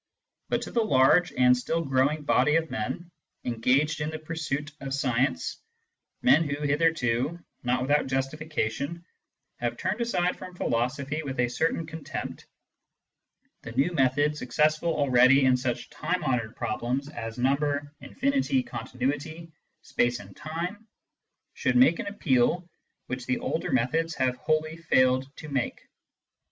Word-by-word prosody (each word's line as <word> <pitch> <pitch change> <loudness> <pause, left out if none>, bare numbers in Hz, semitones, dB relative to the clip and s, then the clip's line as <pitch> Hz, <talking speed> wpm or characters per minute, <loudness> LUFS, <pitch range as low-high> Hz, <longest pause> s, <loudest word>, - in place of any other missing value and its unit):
But - - 0
to - - -7
the 235 - +2
large 175 -1 +4
and 125 0 +5
still 165 +7 -1
growing 135 +3 +1
body 150 +1 +3
of 165 -1 +1
men 170 +11 -4 0.3
engaged 130 +6 +1
in 150 - -1
the 155 - -4
pursuit 155 -2 -4
of 135 0 -3
science 125 - 0 0.3
— - - -55
men 160 - +6
who 145 +1 -3
hitherto, 145 -2 +1 0.2
not 125 +1 0
without 145 +1 +2
justification, 140 +2 -2 0.5
have - - -2
turned - - -2
aside 180 -7 0
from 185 -1 -9
philo 120 -8 +1
sophy 140 +4 -4
with 135 -4 -5
a 120 -1 +2
certain 160 +5 0
contempt 160 0 -6 0.5
— - - -49
the 120 - -8
new 135 +8 +2
method, 145 +1 +2
successful 150 +5 +1
already 135 -2 +5
in 130 -1 +5
such 125 +1 -3
time 175 +4 -2
honoured 120 -6 -1
problems 125 +6 -2
as 115 -6 -6
number, 145 +3 0
infinity, 275 -1 0
continuity, 155 - -4 0.3
space 120 0 0
and 100 -2 -12
time, 180 +8 -5 0.7
should - - 0
make 250 -9 +5
an - - -4
appeal 170 -3 +1 0.4
which 125 -1 -5
the 130 - +1
older 160 - -2
methods 150 +6 +1
have 130 -1 +1
wholly 155 +2 0
failed 130 -5 +3
to 150 - -8
make. 135 -4 -2
145 Hz, 145 wpm, -27 LUFS, 125-160 Hz, 0.7 s, men